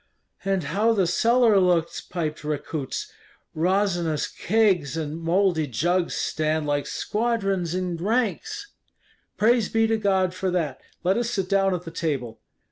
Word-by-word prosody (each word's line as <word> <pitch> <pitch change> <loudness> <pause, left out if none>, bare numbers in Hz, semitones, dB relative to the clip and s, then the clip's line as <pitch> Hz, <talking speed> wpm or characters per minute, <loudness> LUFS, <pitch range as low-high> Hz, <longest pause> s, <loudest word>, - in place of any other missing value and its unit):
"And 195 -2 0
how 205 +10 +2
the 195 -4 +2
cellar 230 +4 +4
looks!" 175 -3 +1
piped 155 -3 -4
Rekuts; 150 -1 -4 0.4
"resinous 175 -2 +1
kegs 185 -9 +1
and 160 +1 -4
mouldy 170 -2 +2
jugs 175 +8 0
stand 155 0 -1
like 145 -1 -1
squadrons 195 -6 -1
in 180 -2 -2
ranks." 225 - -1 0.7
"Praise 225 0 +3
be 225 0 +2
to 225 0 +1
God 190 -3 +1
for 185 +1 -2
that! 165 -7 -2 0.2
let 190 +4 +2
us 235 -1 0
sit 195 -5 -1
down 195 -1 +2
at 175 - -5
the 165 - -8
table." 135 -9 -3
180 Hz, 140 wpm, -24 LUFS, 160-205 Hz, 0.7 s, cellar